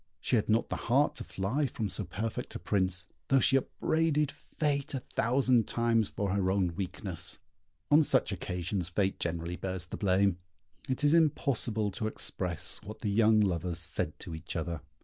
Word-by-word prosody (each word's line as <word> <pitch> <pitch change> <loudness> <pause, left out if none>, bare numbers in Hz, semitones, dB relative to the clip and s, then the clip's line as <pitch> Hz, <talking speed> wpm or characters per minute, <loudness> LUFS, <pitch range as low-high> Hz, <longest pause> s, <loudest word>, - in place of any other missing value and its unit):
She - - 0
had 110 - +1
not 110 +2 +2
the - - -2
heart 140 +5 +4
to - - -5
fly 125 +10 -1
from 115 -3 -3
so 100 +1 -1
perfect 110 +6 -4
a - - -3
prince, 95 -2 +1 0.2
though 135 - +5
she 135 - +3
upbraided 150 +2 +1
fate 140 -2 -2
a - - -1
thousand 125 -1 +2
times 115 -2 +2
for 100 -2 -2
her 95 -1 +1
own 95 -3 +1
weakness. 90 -2 -3 0.5
On 150 +2 +8
such 130 -6 +3
occasions 90 -1 -3
fate 95 +1 0
generally 85 +1 -2
bears 95 -2 -2
the - - -6
blame. 95 -2 +2 0.5
It 130 +2 -1
is 145 +1 +5
impossible 125 -9 +2
to 110 +2 -3
express 90 -6 -3
what 110 +3 -9
the 105 - -1
young 110 +1 +5
lovers 90 -3 0
said 85 -1 -3
to 85 - -6
each 80 - -6
other. 85 0 -3
100 Hz, 175 wpm, -31 LUFS, 90-125 Hz, 0.5 s, On